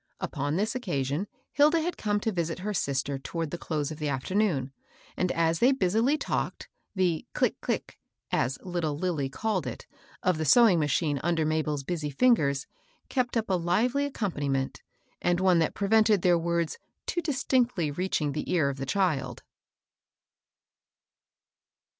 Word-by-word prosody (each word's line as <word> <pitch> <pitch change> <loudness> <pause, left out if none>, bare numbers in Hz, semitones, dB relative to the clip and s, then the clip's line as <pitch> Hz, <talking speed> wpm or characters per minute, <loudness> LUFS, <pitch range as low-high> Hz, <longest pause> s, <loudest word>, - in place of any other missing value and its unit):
Upon 145 +2 -2
this 210 +6 0
occasion 170 - -2 0.2
Hilda 300 +3 +4
had 345 +2 -2
come 205 -1 0
to 225 - 0
visit 170 -3 -2
her 210 - -1
sister 140 -4 -1
toward 165 +3 -4
the 175 - -3
close 150 -2 -2
of 155 - -7
the 150 -1 -1
afternoon, 140 0 0 0.4
and, 180 -1 0
as 165 0 +1
they 250 +3 +5
busily 235 +4 +2
talked, - - -3 0.3
the 180 -4 0
" - - -57
click, - - +1
click," - - -3 0.3
as 135 - +1
little 170 -5 -2
Lil 180 +2 0
ly 135 -2 -1
called 220 +10 -2
it, - - -6 0.4
of 185 -5 +2
the - - 0
sewing 205 - +6
machine 145 0 +1
under 165 -1 +1
Mabel's 150 -2 0
busy 155 -1 -3
fingers, 140 - +2 0.4
kept 250 -2 0
up 225 - -1
a - - +3
lively 215 +11 +1
accompaniment, 145 - -2 0.4
and 175 0 +2
one 185 -2 +4
that 160 - 0
prevented 215 -1 +3
their 180 -1 +5
words 170 -1 -1 0.3
too 345 - -1
distinctly 250 - +1
reach 180 +6 -1
ing 145 -1 0
the 150 +2 -4
ear 160 -6 +3
of 140 - -4
the 135 0 -5
child. 135 -9 0
175 Hz, 160 wpm, -28 LUFS, 145-210 Hz, 0.4 s, sewing